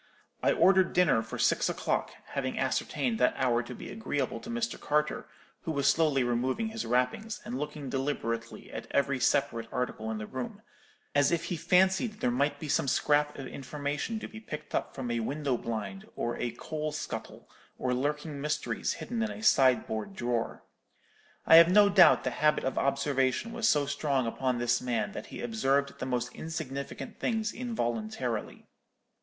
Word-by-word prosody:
I -, -, +3 dB
ordered 190 Hz, -2 st, +4 dB
dinner 180 Hz, -11 st, +4 dB
for 110 Hz, -, -7 dB
six -, -, +2 dB
o'clock, -, -, -1 dB, 0.2 s
having -, -, -2 dB
ascertained 130 Hz, -7 st, 0 dB
that 125 Hz, -, +3 dB
hour 125 Hz, -3 st, +2 dB
to 125 Hz, +1 st, -8 dB
be -, -, -8 dB
agreeable 145 Hz, -, -2 dB
to 225 Hz, -, -10 dB
Mr. 235 Hz, 0 st, -2 dB
Carter, 150 Hz, +1 st, 0 dB, 0.3 s
who 160 Hz, -, -3 dB
was 140 Hz, -2 st, +1 dB
slowly 145 Hz, -3 st, +3 dB
removing 130 Hz, -, 0 dB
his 220 Hz, 0 st, -4 dB
wrappings, 125 Hz, -, 0 dB
and 125 Hz, -, -4 dB
looking 150 Hz, -1 st, -5 dB
deliberately 115 Hz, -4 st, -3 dB
at -, -, -6 dB
every 140 Hz, -1 st, +1 dB
separate 115 Hz, -3 st, +1 dB
article 115 Hz, -3 st, -2 dB
in 110 Hz, -, -2 dB
the 105 Hz, -, -5 dB
room; 130 Hz, +2 st, -6 dB, 0.5 s
as 145 Hz, +1 st, +4 dB
if 170 Hz, -1 st, +1 dB
he 175 Hz, -, -2 dB
fancied 190 Hz, +6 st, +3 dB
there 125 Hz, -12 st, -1 dB
might 140 Hz, +3 st, +1 dB
be 155 Hz, -, -5 dB
some 140 Hz, -, +1 dB
scrap 145 Hz, +2 st, +2 dB
of 135 Hz, -, -6 dB
information 145 Hz, -, -4 dB
to -, -, -6 dB
be 220 Hz, -, -10 dB
picked 155 Hz, -9 st, -8 dB
up -, -, -2 dB
from 125 Hz, -3 st, -3 dB
a 120 Hz, -, 0 dB
window 140 Hz, +3 st, -1 dB
blind, 105 Hz, -5 st, -5 dB
or 120 Hz, 0 st, -2 dB
a 125 Hz, -, -1 dB
coal 155 Hz, +6 st, -4 dB
scuttle, 125 Hz, -7 st, -6 dB, 0.3 s
or 125 Hz, -1 st, 0 dB
lurking 145 Hz, +2 st, -2 dB
mysteries 150 Hz, +1 st, -1 dB
hidden 235 Hz, -1 st, -4 dB
in 225 Hz, -, 0 dB
a 215 Hz, -, -7 dB
sideboard 130 Hz, -, +3 dB
drawer. 120 Hz, -4 st, -2 dB, 0.8 s
I 165 Hz, -, +9 dB
have 170 Hz, +1 st, +9 dB
no 205 Hz, +1 st, +7 dB
doubt 195 Hz, -3 st, +7 dB
the -, -, -1 dB
habit 150 Hz, 0 st, +2 dB
of 130 Hz, -, -1 dB
observation 140 Hz, -, +1 dB
was 225 Hz, -1 st, +2 dB
so 145 Hz, -1 st, +3 dB
strong 140 Hz, -2 st, 0 dB
upon 125 Hz, +2 st, -1 dB
this 120 Hz, 0 st, +1 dB
man 125 Hz, -, -1 dB
that -, -, -7 dB
he -, -, -8 dB
observed 140 Hz, -, 0 dB
the 130 Hz, -, -3 dB
most 125 Hz, -1 st, -2 dB
insignificant 140 Hz, -4 st, -6 dB
things 220 Hz, -2 st, -1 dB
involuntarily. 120 Hz, -, -3 dB
140 Hz, 175 wpm, -30 LUFS, 125-165 Hz, 0.8 s, I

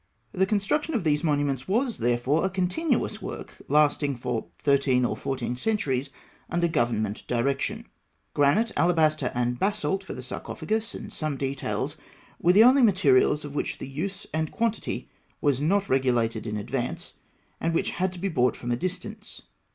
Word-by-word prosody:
The 190 Hz, +6 st, +1 dB
construction 215 Hz, +10 st, 0 dB
of 220 Hz, -, 0 dB
these 150 Hz, -1 st, +1 dB
monuments 145 Hz, -4 st, 0 dB
was, 235 Hz, +4 st, 0 dB
therefore, 120 Hz, +6 st, +1 dB
a 190 Hz, -, +2 dB
continuous 190 Hz, -, 0 dB
work, -, -, -8 dB
lasting 145 Hz, -1 st, +3 dB
for 120 Hz, -1 st, -3 dB
thirteen 135 Hz, -3 st, +2 dB
or 110 Hz, -, -1 dB
fourteen 125 Hz, +1 st, -3 dB
centuries, 140 Hz, -, -1 dB, 0.4 s
under 175 Hz, 0 st, +1 dB
government 110 Hz, -8 st, 0 dB
direction. 125 Hz, +3 st, -1 dB, 0.5 s
Granite, 170 Hz, +11 st, +3 dB
alabaster, 155 Hz, -5 st, +2 dB
and 120 Hz, 0 st, 0 dB
basalt 200 Hz, -1 st, 0 dB
for -, -, -7 dB
the 130 Hz, -, -6 dB
sarcophagus 220 Hz, -, -3 dB
and -, -, -8 dB
some 155 Hz, -3 st, -2 dB
details 135 Hz, 0 st, -2 dB, 0.4 s
were 175 Hz, -, +5 dB
the 210 Hz, +4 st, +8 dB
only 260 Hz, +3 st, +6 dB
materials 150 Hz, -, +4 dB
of 145 Hz, -, -7 dB
which 145 Hz, -, -2 dB
the -, -, -7 dB
use 175 Hz, +9 st, -4 dB
and 155 Hz, 0 st, 0 dB
the -, -, -15 dB
quantity 230 Hz, -1 st, -2 dB, 0.3 s
was 140 Hz, -3 st, +1 dB
not 195 Hz, +6 st, +2 dB
regulated 120 Hz, -4 st, +1 dB
in 105 Hz, 0 st, -2 dB
advance, 120 Hz, +4 st, -4 dB, 0.5 s
and 165 Hz, 0 st, 0 dB
which -, -, +1 dB
had 185 Hz, +1 st, -1 dB
to -, -, -9 dB
be 190 Hz, +3 st, -2 dB
brought 125 Hz, -8 st, +2 dB
from 120 Hz, -, -4 dB
a -, -, +2 dB
distance. 210 Hz, -, -5 dB
150 Hz, 165 wpm, -26 LUFS, 125-190 Hz, 0.5 s, the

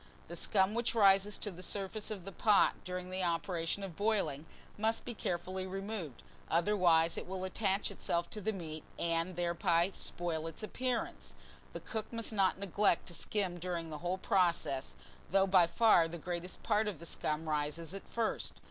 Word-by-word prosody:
THE -, -, -5 dB
SCUM 195 Hz, -1 st, +2 dB
WHICH 235 Hz, +1 st, 0 dB
RISES 200 Hz, -1 st, +5 dB
to 205 Hz, -, -3 dB
the 180 Hz, 0 st, -10 dB
surface 200 Hz, +3 st, -1 dB
of 200 Hz, -5 st, -5 dB
the 195 Hz, -, -6 dB
pot 210 Hz, +1 st, +4 dB
during 180 Hz, 0 st, -5 dB
the 185 Hz, 0 st, -2 dB
operation 170 Hz, +1 st, -1 dB
of 185 Hz, -4 st, -6 dB
boiling 180 Hz, -8 st, 0 dB, 0.3 s
must 220 Hz, +2 st, 0 dB
be 245 Hz, -, -4 dB
carefully 185 Hz, -1 st, -3 dB
removed, 195 Hz, -, -5 dB, 0.3 s
otherwise 170 Hz, -2 st, +3 dB
it -, -, -8 dB
will 185 Hz, 0 st, -4 dB
attach 195 Hz, +1 st, 0 dB
itself 170 Hz, -3 st, -1 dB
to 215 Hz, -, -4 dB
the 220 Hz, +3 st, 0 dB
meat, 160 Hz, -6 st, -6 dB
and 170 Hz, +1 st, 0 dB
thereby 175 Hz, +1 st, +2 dB
spoil 165 Hz, -2 st, -1 dB
its 165 Hz, +5 st, -6 dB
appearance. 245 Hz, +2 st, -3 dB, 0.4 s
The -, -, -6 dB
cook 220 Hz, -2 st, -4 dB
must 230 Hz, -1 st, 0 dB
not 195 Hz, -3 st, +3 dB
neglect 200 Hz, -1 st, +1 dB
to -, -, -8 dB
skim 185 Hz, -1 st, -2 dB
during 170 Hz, -2 st, -3 dB
the 150 Hz, -, -5 dB
whole 180 Hz, +3 st, -1 dB
process, 175 Hz, -, +1 dB, 0.3 s
though 195 Hz, +2 st, +4 dB
by 185 Hz, -3 st, +5 dB
far 175 Hz, -3 st, +5 dB
the 170 Hz, +1 st, -6 dB
greater 175 Hz, +2 st, -4 dB
part 215 Hz, -1 st, +2 dB
of 205 Hz, -5 st, -3 dB
the 170 Hz, -, -9 dB
scum 155 Hz, -1 st, -2 dB
rises 150 Hz, +3 st, -1 dB
at 195 Hz, -, -8 dB
first. 230 Hz, -2 st, -1 dB
185 Hz, 175 wpm, -34 LUFS, 170-205 Hz, 0.4 s, RISES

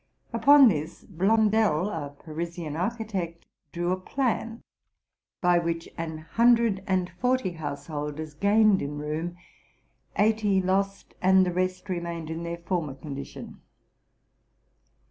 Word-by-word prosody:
Upon 285 Hz, -1 st, +7 dB
this, 155 Hz, -7 st, -2 dB
Blondel, 205 Hz, -1 st, +2 dB
a 145 Hz, -3 st, -4 dB
Parisian 160 Hz, +1 st, -6 dB
architect, 185 Hz, -3 st, -3 dB, 0.3 s
drew 175 Hz, +1 st, -1 dB
a 185 Hz, -, +1 dB
plan, 230 Hz, +1 st, -2 dB, 0.8 s
by 175 Hz, -1 st, +4 dB
which 165 Hz, -1 st, -2 dB
an 165 Hz, -1 st, -4 dB
hundred 230 Hz, +4 st, +3 dB
and 185 Hz, -1 st, 0 dB
forty 250 Hz, -6 st, +1 dB
householders 150 Hz, -1 st, -5 dB
gained 205 Hz, +4 st, +4 dB
in 145 Hz, +1 st, -4 dB
room, 155 Hz, +4 st, -4 dB, 0.8 s
eighty 210 Hz, -2 st, +3 dB
lost, 195 Hz, +1 st, -1 dB
and 190 Hz, 0 st, +5 dB
the 180 Hz, -, -2 dB
rest 185 Hz, +1 st, -1 dB
remained 170 Hz, -3 st, -4 dB
in 160 Hz, +1 st, -4 dB
their 170 Hz, 0 st, -4 dB
former 170 Hz, -5 st, -3 dB
condition. 140 Hz, -1 st, -8 dB
180 Hz, 115 wpm, -27 LUFS, 160-205 Hz, 0.8 s, Upon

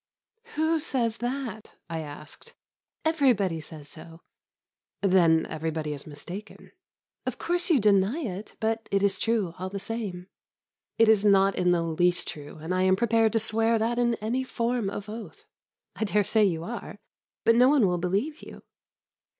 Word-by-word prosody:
"Who 315 Hz, +1 st, +2 dB
says 240 Hz, -7 st, -1 dB
that?" 245 Hz, -3 st, -4 dB
I 165 Hz, -1 st, -4 dB
asked. 150 Hz, -, -10 dB, 0.5 s
"Everybody 240 Hz, -, +2 dB
says 150 Hz, -1 st, -9 dB
so." 165 Hz, +2 st, -11 dB, 0.8 s
"Then 170 Hz, -4 st, +4 dB
everybody 155 Hz, -1 st, -3 dB
is 145 Hz, +1 st, -7 dB
mistaken." 175 Hz, +8 st, -9 dB, 0.6 s
"Of -, -, -2 dB
course 350 Hz, +2 st, 0 dB
you 315 Hz, -6 st, +5 dB
deny 205 Hz, +4 st, +3 dB
it; 205 Hz, -, -6 dB
but 225 Hz, 0 st, -1 dB
it 200 Hz, 0 st, +2 dB
is 195 Hz, -1 st, +2 dB
true, 220 Hz, -7 st, 0 dB
all 185 Hz, +1 st, -3 dB
the 200 Hz, +1 st, -5 dB
same." 195 Hz, -5 st, -5 dB, 0.7 s
"It 225 Hz, -, +5 dB
is 215 Hz, -2 st, +5 dB
not 195 Hz, -1 st, +5 dB
in 180 Hz, -, +1 dB
the 170 Hz, -1 st, +2 dB
least 175 Hz, +2 st, +1 dB
true, 145 Hz, 0 st, -8 dB
and 160 Hz, +4 st, -4 dB
I 185 Hz, -, +1 dB
am 185 Hz, 0 st, +4 dB
prepared 225 Hz, +1 st, +2 dB
to 225 Hz, -, +3 dB
swear 225 Hz, +1 st, +1 dB
that 230 Hz, +2 st, 0 dB
in 240 Hz, -1 st, +2 dB
any 230 Hz, +5 st, -2 dB
form 235 Hz, -4 st, -1 dB
of 200 Hz, 0 st, -6 dB
oath." 220 Hz, +1 st, -9 dB, 0.5 s
"I -, -, -2 dB
dare 210 Hz, 0 st, +2 dB
say 215 Hz, +2 st, +3 dB
you 165 Hz, -4 st, -1 dB
are, 230 Hz, +2 st, -6 dB, 0.5 s
but 230 Hz, -, +6 dB
no 250 Hz, +3 st, +6 dB
one 280 Hz, -6 st, +4 dB
will 180 Hz, -2 st, +1 dB
believe 200 Hz, -, -1 dB
you." -, -, -12 dB
205 Hz, 165 wpm, -27 LUFS, 180-230 Hz, 0.8 s, but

